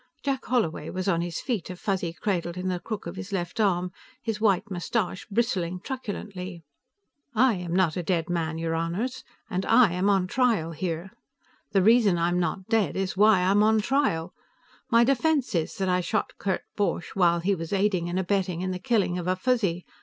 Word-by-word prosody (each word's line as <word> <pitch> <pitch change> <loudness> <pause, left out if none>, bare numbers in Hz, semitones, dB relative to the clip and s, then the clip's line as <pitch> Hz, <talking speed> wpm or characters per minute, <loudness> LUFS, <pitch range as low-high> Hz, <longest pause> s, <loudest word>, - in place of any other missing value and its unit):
Jack 275 -2 -1
Holloway 170 -11 0
was 185 +1 -3
on 170 -3 +2
his 170 -1 -3
feet, 225 -11 -2
a 185 - -5
Fuzzy 185 -2 -2
cradled 175 -1 -2
in 185 +1 -2
the 180 -1 -1
crook 215 +2 -5
of 170 +2 -6
his 200 +1 -7
left 180 +3 -3
arm, 180 -4 +1 0.3
his 225 -4 -4
white 205 -1 +2
mustache 185 +1 -2
bristling 190 -5 0
truculently. 195 -7 -6 0.7
"I 250 +2 +5
am 180 -3 -3
not 180 -4 +2
a 180 - -1
dead 170 -1 0
man, 165 -2 -1
your 165 0 -2
Honors, 175 +10 -2 0.2
and 185 +1 -2
I 230 -3 +5
am 180 +3 +1
on 195 -2 +3
trial 220 -6 +1
here. 170 +2 -4 0.6
The 195 -2 +4
reason 220 -4 +5
I'm 175 +1 +1
not 180 +2 -2
dead 215 -8 +1
is 190 -1 -1
why 205 -1 +5
I 185 +1 +3
am 205 +1 +4
on 220 +1 +4
trial. 210 - 0 0.6
My 235 -1 +5
defense 275 +1 +1
is 165 -3 -1
that 190 - -1
I 180 0 +2
shot 215 +4 -1
Kurt 190 -2 -1
Borch 200 -4 -1
while 170 -3 +3
he 190 +4 +1
was 165 -3 -5
aiding 195 -3 +1
and 175 - -2
abetting 185 -2 0
in 185 0 -2
the 185 - -4
killing 190 -4 +1
of 175 - -5
a 185 - +2
Fuzzy. 195 -5 0
185 Hz, 200 wpm, -26 LUFS, 175-215 Hz, 0.7 s, I